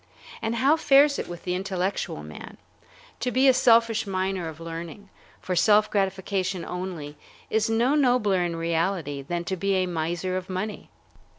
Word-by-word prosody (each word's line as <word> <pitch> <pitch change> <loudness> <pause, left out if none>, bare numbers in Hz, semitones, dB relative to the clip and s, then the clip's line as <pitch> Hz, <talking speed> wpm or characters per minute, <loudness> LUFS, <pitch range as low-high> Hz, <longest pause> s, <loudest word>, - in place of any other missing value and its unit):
And 225 +1 -1
how 275 +6 +3
fares 280 -1 +5
it - - -4
with 175 -1 -8
the 180 - -2
intellectual 185 - -2
man? 75 0 -10 0.6
To 250 - -1
be 260 +2 +3
a 260 - +7
selfish 230 -3 +3
miner 190 -2 -2
of 160 0 -11
learning, 165 +4 -8 0.3
for 185 - -3
self 210 +4 +4
gratification 190 -2 -1
only, 175 -5 -6 0.3
is 220 0 +1
no 235 +5 +2
nobler 245 -10 +3
in 170 -1 -2
reality 165 -3 -1
than 170 +5 -3
to 190 - -3
be 195 +2 0
a 185 -1 +2
miser 175 +2 -2
of 185 0 -6
money. 190 +3 -4
190 Hz, 165 wpm, -25 LUFS, 170-220 Hz, 0.6 s, a